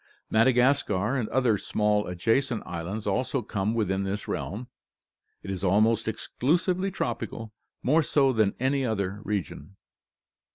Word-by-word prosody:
Madagascar 125 -2 +3
and 120 -5 -1
other 120 -6 +2
small 105 +1 +1
adjacent 115 +7 0
islands 90 +5 -5
also 125 +5 0
come 105 +1 -1
within 100 -3 0
this 100 +1 -3
realm. 115 +6 -4 0.8
It 95 - -5
is 95 -1 -5
almost 110 +4 +3
exclusively 175 - 0
tropical, 115 - -4 0.3
more 155 +6 +4
so 135 -2 +2
than 110 -4 +2
any 135 +2 +1
other 100 -4 -2
region. 100 -1 -4
110 Hz, 125 wpm, -27 LUFS, 100-130 Hz, 0.8 s, more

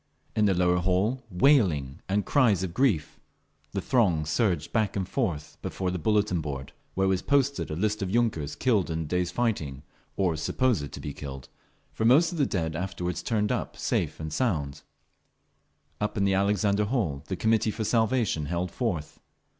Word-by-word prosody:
In 105 - +3
the 95 -2 +3
lower 90 0 +3
hall 95 +8 +1
wailing 90 - +3
and 100 +1 +1
cries 115 - +3
of 90 -3 -4
grief; 100 - +1 0.5
the 100 - -2
throng 90 - +2
surged 80 0 0
back 110 -3 +1
and 95 -2 -1
forth 85 - -3
before 95 -1 -2
the 90 - -3
bulletin 100 -1 +1
board, 70 -3 -6 0.2
where 95 0 +2
was 95 -1 +1
posted 140 0 +1
a 75 - -3
list 105 +4 0
of 95 - -1
yunkers 100 -10 0
killed 110 -9 +2
in 80 0 -2
the - - -3
day's 90 +3 0
fighting—or 85 - -2
supposed 85 - 0
to - - -8
be 75 - -5
killed, 70 -2 -8 0.4
for - - -3
most 145 +10 +5
of 170 - -5
the 140 - +3
dead 80 -4 -2
afterward 90 0 -3
turned 105 -2 0
up - - -3
safe - - -1
and 80 -1 -5
sound…. 75 - -1 1.2
Up 105 0 -2
in 100 - +2
the 100 - +2
Alexander 100 +1 +2
Hall 100 - -1
the 95 - -2
Committee 110 +2 +2
for 110 +1 -3
Salvation 110 - +1
held 85 +1 -2
forth. 95 - -3
95 Hz, 175 wpm, -27 LUFS, 80-110 Hz, 1.2 s, most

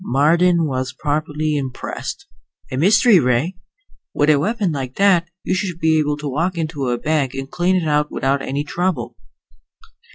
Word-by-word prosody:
Marden 170 +4 +3
was 130 -2 -3
properly 150 +1 -2
impressed. 140 - -5 0.5
"A - - -3
mystery 205 - +5
ray! 130 +7 +1 0.6
With 145 +1 +4
a 145 - +3
weapon 205 +2 0
like 130 -3 -5
that, 185 -4 +3
you - - -1
should 185 -2 -2
be 160 -1 +3
able 150 -1 0
to 150 0 -5
walk 165 +6 -1
into 155 -5 -3
a 120 0 0
bank 145 -2 -1
and 135 0 -6
clean 180 +2 +1
it 175 -3 0
out 150 0 +1
without 135 +1 0
any 140 +2 -2
trouble." 145 -8 -2
150 Hz, 165 wpm, -20 LUFS, 135-175 Hz, 0.6 s, mystery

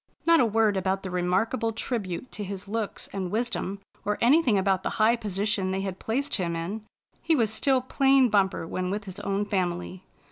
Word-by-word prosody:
Not 335 0 +6
a 245 - +4
word 215 -2 +2
about 190 +1 -1
the 190 - -5
remarkable 190 +7 0
tribute 225 -2 -3
to 210 - -5
his 195 0 -6
looks 220 0 -3
and 190 -2 -3
wisdom, 215 -2 -2 0.2
or 210 0 -1
anything 250 -3 +4
about 190 -1 +2
the - - -2
high 220 +2 +4
position 205 -3 -1
they 190 +1 -1
had 190 -1 -4
placed 270 +6 -2
him 170 -3 -2
in. 180 +7 -4 0.4
He 325 - +2
was 225 -5 +1
still 260 +3 +2
plain 270 0 +4
Bumper 195 -6 +1
when 180 +2 -3
with 205 +2 -2
his 195 0 -7
own 200 0 -1
family. 180 -2 -2
205 Hz, 190 wpm, -26 LUFS, 190-230 Hz, 0.4 s, Not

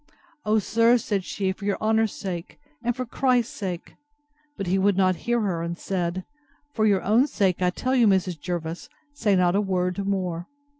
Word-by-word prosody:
O, 215 +1 +3
sir, 230 +3 +4
said 205 -4 -2
she, 190 +1 -2
for 200 +1 -8
your 200 -1 0
honour's 220 0 +2
sake, 180 -4 -6 0.3
and 240 0 0
for 255 0 -3
Christ's 250 -1 +1
sake!—But 290 - -8
he 185 +2 +1
would 195 0 +2
not 185 -1 +3
hear 240 -1 +3
her, 185 -5 -1
and 170 +1 -3
said—For 215 +8 -3
your 200 -3 +2
own 230 +7 +4
sake, 190 - 0
I 180 - +3
tell 255 +8 -2
you, 245 -4 +5
Mrs. 185 -4 +1
Jervis, 170 0 -4 0.2
say 215 -8 +2
not 180 0 +3
a 205 - +3
word 185 0 -1
more. 180 -3 -2
200 Hz, 180 wpm, -25 LUFS, 180-235 Hz, 0.3 s, you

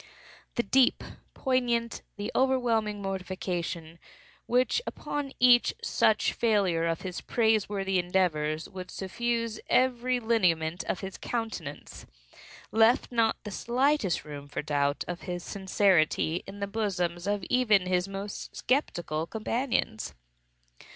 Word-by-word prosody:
The 235 - +1
deep, 255 +4 +4
the - - -12 0.2
poignant, 240 -3 0 0.2
the 205 0 -4
overwhelming 230 -6 +1
mortification, 180 -3 -4 0.5
which 250 - +2
upon 290 -2 -4
each 245 -1 +5
such 215 -1 +2
failure 195 -8 +2
of 165 -1 -1
his 180 -2 -5
praise 220 -3 +2
worthy 195 -2 0
endeavors, 165 -4 0
would 185 -1 -8
suffuse 230 +3 -2
every 250 0 +2
lineament 180 -8 +1
of - - -2
his 190 -1 -7
countenance, 220 -11 -5 0.6
left 225 +4 +4
not 230 -2 +1
the 210 - -6
slightest 245 - +1
room 145 -1 -8
for 145 - -4
doubt 145 -1 0
of 175 0 -5
his 175 -1 -3
sincerity 185 -4 +2
in 200 +1 -9
the - - +1
bosoms 190 -4 -2
of 205 -2 0
even 215 -7 +3
his 180 0 +1
most 195 +1 -6
skeptical 175 - -1
companions. 225 - -2
200 Hz, 125 wpm, -28 LUFS, 175-235 Hz, 0.6 s, each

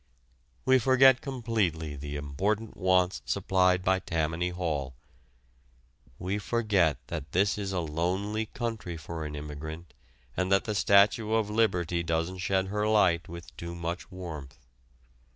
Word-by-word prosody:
We 130 0 +5
forget 130 +1 +6
completely 110 - -1
the 70 +1 -6
important 100 +10 -2
wants 90 -6 +2
supplied 90 +7 +2
by 95 0 +2
Tammany 80 +1 -1
Hall. 75 -8 -3 1.2
We 95 +3 -2
forget 100 - +1
that 70 +1 -6
this 100 +3 +3
is 100 -2 -3
a 90 -2 -1
lonely 95 +7 -1
country 115 -8 -4
for 80 +1 -6
an 75 - -7
immigrant 75 +3 -7 0.4
and 95 0 -1
that 95 - +4
the 105 - -2
Statue 100 +2 +4
of 110 -2 +1
Liberty 90 -6 +1
doesn't 85 +2 -1
shed 95 +1 0
her 105 +1 0
light 95 -7 +3
with 85 0 -10
too 85 0 -6
much 85 +2 -4
warmth. 80 -7 -8
90 Hz, 135 wpm, -29 LUFS, 80-105 Hz, 1.2 s, forget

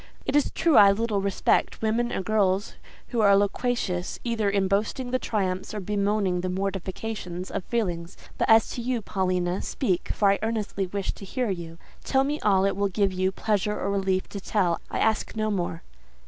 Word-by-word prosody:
"It 265 - -1
is 295 - +3
true 325 -3 +2
I 200 -1 +9
little 210 -1 0
respect 195 -1 +1
women 235 +2 +1
or - - -2
girls 200 -1 +1 0.4
who 235 -3 0
are 200 -1 +6
loquacious 205 -3 -1
either 230 -4 0
in 195 -1 +1
boasting 220 +6 -1
the 255 - +1
triumphs, 190 -3 -2
or - - -2
bemoaning 200 -2 0
the 185 - -2
mortifications, 190 0 -4
of - - -3
feelings. 180 -7 -2 0.2
But - - +1
as 225 0 +6
to 240 - -4
you, 240 -2 -1
Paulina, 185 -2 -1
speak, 185 -9 -1
for 200 -2 +3
I 200 - +1
earnestly 215 -3 -2
wish 195 +1 -2
to - - -12
hear 240 +2 -2
you. 170 -3 -6 0.3
Tell 265 0 +2
me 295 +2 -1
all 195 -2 +3
it 195 - +1
will 200 0 0
give 195 0 +1
you 185 +1 +1
pleasure 210 0 -1
or 200 - -1
relief 190 -1 0
to 200 - -6
tell: 185 -5 0
I - - -3
ask 220 0 0
no 215 0 0
more." 175 -3 -2
200 Hz, 190 wpm, -26 LUFS, 185-220 Hz, 0.4 s, I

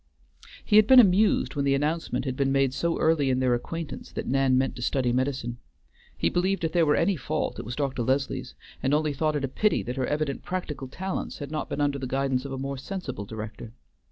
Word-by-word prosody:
He 210 - +4
had 215 -1 +7
been 260 +1 +9
amused 205 -4 +4
when 140 - 0
the 140 0 +3
announcement 155 +4 -1
had 130 -2 -2
been 135 0 +1
made 135 -1 +2
so 170 +4 0
early 155 -4 +2
in 130 0 +1
their 130 -1 +2
acquaintance 160 +6 -5
that - - -4
Nan 135 -1 +2
meant 130 0 0
to - - -7
study 125 -1 +1
medicine. 125 -2 -1 0.6
He - - +1
believed 185 +1 0
if 160 - 0
there 170 -2 +3
were 150 - +4
any 185 +3 +2
fault, 150 - -3
it - - -6
was 120 +3 -5
Dr. 135 -3 -1
Leslie's, 135 +3 -1 0.3
and 135 +2 +2
only 150 -1 +1
thought 155 +2 0
it 140 -2 0
a - - -2
pity 210 +11 +1
that 125 +2 -5
her 130 - 0
evident 150 -2 -1
practical 160 -7 -4
talents 190 +8 -4
had 145 -1 -7
not 155 - -3
been 145 - -2
under 140 -1 +1
the 130 - -4
guidance 135 0 0
of 140 - -6
a 135 - -4
more 135 0 -4
sensible 135 - -5
director. 110 +1 -8
140 Hz, 230 wpm, -26 LUFS, 130-160 Hz, 0.6 s, been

